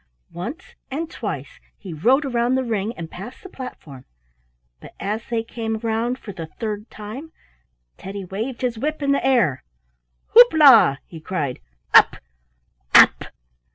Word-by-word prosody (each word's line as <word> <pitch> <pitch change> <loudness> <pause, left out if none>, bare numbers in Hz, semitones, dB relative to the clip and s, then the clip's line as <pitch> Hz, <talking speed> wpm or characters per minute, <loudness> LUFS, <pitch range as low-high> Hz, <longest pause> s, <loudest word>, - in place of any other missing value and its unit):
Once 245 - -7 0.2
and 315 +5 -4
twice - - -6 0.2
he 185 -4 -9
rode 255 - +2
round 245 0 0
the 260 - 0
ring 220 -3 -2
and 165 -2 -7
past 210 +8 -10
the 380 - -10
platform, 150 - -10 0.8
but - - -14
as 210 +3 -3
they 230 -1 -1
came 225 -1 -4
round 230 +2 -2
for 215 - -9
the 165 -3 -7
third 210 +4 -6
time, 230 +10 -9 0.7
Teddy 195 0 -7
waved 225 +8 -5
his 240 -3 -1
whip 305 +3 -3
in 280 - +1
the 280 - +1
air. 230 - +2 0.7
"Houp 480 -3 +8
la!" 265 - +7
he 165 - -11
cried. 155 -6 -4 0.3
"Up! - - +7 0.8
up!" - - +7
225 Hz, 150 wpm, -22 LUFS, 195-260 Hz, 0.8 s, Houp